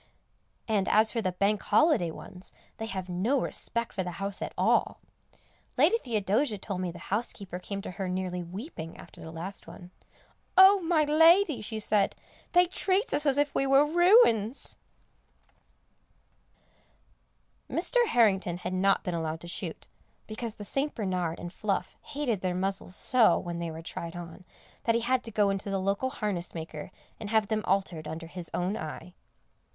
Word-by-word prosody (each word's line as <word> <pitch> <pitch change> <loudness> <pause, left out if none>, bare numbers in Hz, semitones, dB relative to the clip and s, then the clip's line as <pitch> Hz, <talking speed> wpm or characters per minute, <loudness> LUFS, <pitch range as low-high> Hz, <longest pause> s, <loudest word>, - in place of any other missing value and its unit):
And 205 -4 +1
as 215 +1 +4
for 230 - -1
the 185 -3 -1
Bank 200 +3 +1
Holiday 300 - +3
ones, 180 +3 -10 0.2
they 225 - -4
have 190 -3 -5
no 195 +10 +1
respect 235 -1 -3
for 190 - -2
the 180 -1 -4
house 195 0 -4
at - - -3
all. - - +2 0.8
Lady 460 - +4
Theodosia 220 - 0
told 190 -1 -4
me 180 - -2
the 170 - -11 0.2
housekeeper 200 -4 -3
came 200 +1 -6
to - - -6
her 190 0 -4
nearly 180 -1 -2
weeping 175 - -8
after - - -13
the 160 - -8
last 165 +4 -7
one. 175 +1 -12 0.7
"Oh, 380 +1 +8
my 330 -2 +2
lady," 325 +1 +5
she 220 +1 -4
said, 210 -2 +1 0.4
"they 355 0 +6
treats 380 +4 0
us 295 - +1
as 280 -1 +2
if 290 0 +1
we 275 - +1
was 285 +3 +4
ruins." 345 - +4 2.9
Mr. 475 +8 +2
Harrington 195 - +2
had 180 +1 -5
not 195 +1 +2
been 180 - -3
allowed 160 -1 -3
to 175 - -7
shoot, 170 - -5 0.4
because 220 0 -5
the 205 - -8
St. 280 +7 -1
Bernard 180 -6 -2
and 175 +1 -7
Fluff 200 -1 -2
hated 255 -9 -2
their 180 -1 -1
muzzles 190 0 -1
so, 245 -3 +5
when 170 -1 -5
they 170 -1 -3
were 160 +1 -8
tried 170 +1 -6
on, 175 +1 -9 0.4
that 230 - +3
he 230 - +1
had 250 +2 +1
to 225 - -5
go 205 -2 +2
in 195 - -1
to 200 - -7
the 195 - 0
local 200 +7 0
harness 200 -9 -3
maker 160 -1 -7 0.3
and 215 - -6
have 220 -2 +2
them 215 -1 0
altered 180 -5 0
under 165 +2 -6
his 170 0 -8
own 185 +4 -1
eye. 165 +1 -7
200 Hz, 175 wpm, -28 LUFS, 180-245 Hz, 2.9 s, Oh